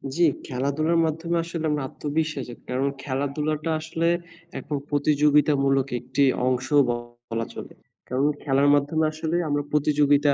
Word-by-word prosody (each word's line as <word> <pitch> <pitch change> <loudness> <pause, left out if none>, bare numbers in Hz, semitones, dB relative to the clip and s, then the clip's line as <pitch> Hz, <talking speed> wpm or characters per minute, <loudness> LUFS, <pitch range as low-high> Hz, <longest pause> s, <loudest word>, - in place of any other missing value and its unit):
জি, 175 - +2 0.2
খেলাধুলার 140 +6 0
মাধ্যমে 165 +2 -2
আসলে 165 -1 -4
আমার 150 -2 -1
আত্মবিশ্বাস 155 -1 -2
জাগে। 120 - -9
কারণ 130 +2 0 0.2
খেলাধুলাটা 150 +3 -2
আসলে 165 +1 -1 0.5
একরকম 145 +1 -4
প্রতিযোগিতামূলক 145 -2 +3
একটি 130 +4 0 0.2
অংশ 130 0 0 0.2
বলা 120 -1 -4
চলে। - - -8 0.4
কারণ, 130 +3 +1 0.2
খেলার 140 0 +3
মাধ্যমে 145 +3 +1
আসলে 155 +1 -3
আমরা 145 0 0
প্রতিযোগিতা 145 -1 +3
145 Hz, 130 wpm, -24 LUFS, 135-155 Hz, 0.5 s, প্রতিযোগিতামূলক